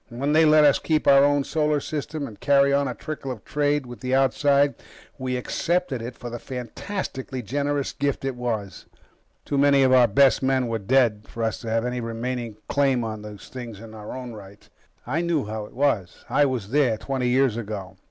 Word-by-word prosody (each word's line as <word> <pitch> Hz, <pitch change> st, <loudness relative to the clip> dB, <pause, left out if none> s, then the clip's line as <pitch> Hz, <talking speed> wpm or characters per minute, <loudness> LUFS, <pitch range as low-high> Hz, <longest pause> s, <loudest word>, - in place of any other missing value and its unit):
When 140 Hz, +5 st, -1 dB
they 160 Hz, +1 st, +6 dB
let 155 Hz, 0 st, +6 dB
us 145 Hz, -1 st, +5 dB
keep 155 Hz, -2 st, 0 dB
our 140 Hz, 0 st, +7 dB
own 145 Hz, 0 st, +3 dB
solar 150 Hz, 0 st, +1 dB
system 150 Hz, 0 st, -4 dB
and 110 Hz, -6 st, -10 dB
carry 140 Hz, 0 st, +4 dB
on 140 Hz, 0 st, +2 dB
a 125 Hz, -, -4 dB
trickle 150 Hz, -1 st, -6 dB
of 120 Hz, -5 st, -7 dB
trade 145 Hz, -1 st, 0 dB
with 120 Hz, -1 st, -10 dB
the 130 Hz, 0 st, 0 dB
outside, 140 Hz, +1 st, +3 dB, 0.5 s
we 130 Hz, -1 st, -2 dB
accepted 165 Hz, +1 st, -1 dB
it 120 Hz, +2 st, -6 dB
for 120 Hz, -, -8 dB
the 120 Hz, -, -5 dB
fantastically 130 Hz, -, -5 dB
generous 140 Hz, +4 st, -1 dB
gift 140 Hz, -1 st, -2 dB
it 135 Hz, -2 st, -2 dB
was. 115 Hz, -5 st, -4 dB, 0.6 s
Too 140 Hz, -, -1 dB
many 140 Hz, -1 st, +5 dB
of 130 Hz, 0 st, +4 dB
our 125 Hz, -2 st, +6 dB
best 135 Hz, +5 st, +4 dB
men 130 Hz, -1 st, +1 dB
were 115 Hz, -1 st, -2 dB
dead 110 Hz, -1 st, +2 dB
for 115 Hz, -, -5 dB
us 110 Hz, -1 st, -1 dB
to 115 Hz, -, -6 dB
have 115 Hz, +1 st, 0 dB
any 125 Hz, 0 st, -2 dB
remaining 115 Hz, -1 st, -4 dB
claim 135 Hz, -4 st, +2 dB
on 110 Hz, -1 st, -5 dB
these 105 Hz, -1 st, -10 dB
things 120 Hz, -5 st, -8 dB
in 110 Hz, 0 st, -11 dB
our 110 Hz, +3 st, -7 dB
own 125 Hz, -2 st, -7 dB
right. 100 Hz, -1 st, -13 dB, 0.4 s
I 150 Hz, +7 st, -1 dB
know 170 Hz, -4 st, 0 dB
how 110 Hz, 0 st, -5 dB
it -, -, -18 dB
was. 125 Hz, -10 st, -1 dB
I 145 Hz, -, +3 dB
was 120 Hz, -6 st, -3 dB
there, 135 Hz, -6 st, +3 dB
twenty 130 Hz, +1 st, -2 dB
years 130 Hz, -2 st, +3 dB
ago. 105 Hz, -5 st, -6 dB
130 Hz, 205 wpm, -24 LUFS, 115-140 Hz, 0.6 s, our